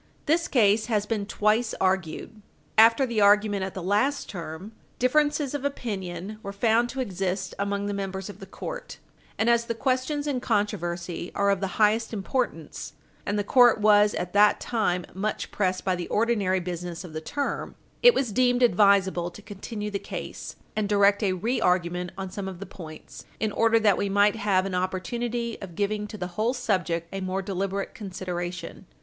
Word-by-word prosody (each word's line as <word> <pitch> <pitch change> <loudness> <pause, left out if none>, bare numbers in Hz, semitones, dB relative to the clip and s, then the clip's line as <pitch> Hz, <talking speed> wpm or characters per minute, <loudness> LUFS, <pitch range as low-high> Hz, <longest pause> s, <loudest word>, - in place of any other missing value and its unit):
This 330 +3 +2
case 215 -3 +3
has 210 -3 +1
been 210 -2 -2
twice 215 +3 +1
argued. 190 +3 -1 0.3
After 230 +4 +6
the 235 -4 -1
argument 205 -1 +4
at 190 - -5
the 185 - -5
last 215 +10 +1
term, 175 +2 -7 0.3
differences 295 +2 +2
of 290 -2 -3
opinion 205 -7 -4
were 200 - -6
found 225 +4 +2
to 270 - -3
exist 190 -4 -2
among 200 0 -1
the 205 - -2
members 195 -1 -4
of 205 - -10
the 195 - -10
court, - - -7 0.4
and 220 - +1
as 235 0 +3
the 230 - -3
questions 260 +4 -1
in 280 -4 -1
controversy 175 -6 -2
are 200 0 +3
of 195 - +1
the 195 0 -4
highest 220 +2 +2
importance, 205 - -3 0.3
and 205 +1 0
the 205 - +1
court 240 +1 +5
was 210 0 +5
at 180 0 -4
that 205 +1 +5
time 180 -7 -1
much 205 +3 -3
pressed 185 -2 -1
by 185 -1 +2
the 175 -1 -5
ordinary 210 -4 +1
business 175 0 -5
of 175 -4 -10
the 155 - -4
term, 285 - -3 0.3
it 485 -1 +7
was 255 -5 0
deemed 245 +2 +3
advisable 190 -4 +4
to 195 +4 -13
continue 210 +1 -6
the 200 - -2
case - - -7 0.2
and 210 -2 -1
direct 200 0 +4
a 195 -3 +1
re 225 +8 -1
argument 180 0 +1
on 190 -1 -5
some 195 0 -5
of 185 -2 -7
the 200 - -6
points 160 -4 -11
in 220 -1 0
order 230 +1 +3
that 210 -4 +3
we 200 - 0
might 205 +1 +4
have 200 -3 +1
an 195 - -4
opportunity 230 +6 -2
of 180 -4 -8
giving 210 +2 -1
to 215 - -8
the 180 - -3
whole 215 +8 -1
subject 180 -8 -1
a 195 - -3
more 190 +1 -2
deliberate 195 0 -3
Page - - -14
60 - - -17
U. 200 - -5
S. 185 0 -7
400 175 -1 -2
consideration. 175 0 -7
205 Hz, 195 wpm, -26 LUFS, 185-230 Hz, 0.4 s, it